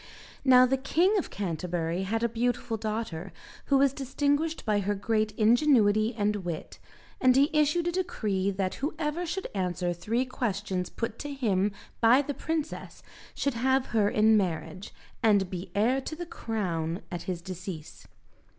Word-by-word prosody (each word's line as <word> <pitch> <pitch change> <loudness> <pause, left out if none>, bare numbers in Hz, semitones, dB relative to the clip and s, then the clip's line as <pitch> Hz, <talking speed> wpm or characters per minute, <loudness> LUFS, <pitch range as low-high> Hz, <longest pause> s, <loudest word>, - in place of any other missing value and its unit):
Now 255 -1 +7
the 265 +1 +1
King 345 +9 +2
of - - -4
Canterbury 175 -2 -2
had 225 +4 -1
a - - +4
beautiful 235 0 -1
daughter, 215 -5 -4 0.3
who 280 - +3
was 275 -1 +4
distinguished 285 +4 -1
by 210 -2 +2
her 205 +1 -1
great 215 +1 0
ingenuity 225 -2 +4
and 210 0 +1
wit, 175 -5 -6 0.4
and 255 -1 +5
he 280 +4 +4
issued 305 +3 +2
a - - +1
decree 215 - -1
that 190 -1 -1
whoever 310 +3 -2
should 380 +4 -3
answer 180 -2 -1
three 220 +9 -1
questions 200 -7 -2
put 230 -1 -4
to 290 - -5
him 210 -7 +1 0.3
by 245 +5 +5
the 285 - -3
princess 320 +1 -4 0.3
should 280 - 0
have 260 +3 +2
her 210 -2 +3
in 220 +1 +4
marriage, 180 -1 -2 0.3
and 205 -5 +3
be 180 0 -5
heir 245 +6 +2
to 315 - -6
the 345 +2 -6
crown 180 - -3
at 175 -2 -4
his 180 -2 -2
decease. 180 -3 -8
220 Hz, 160 wpm, -28 LUFS, 190-270 Hz, 0.4 s, Now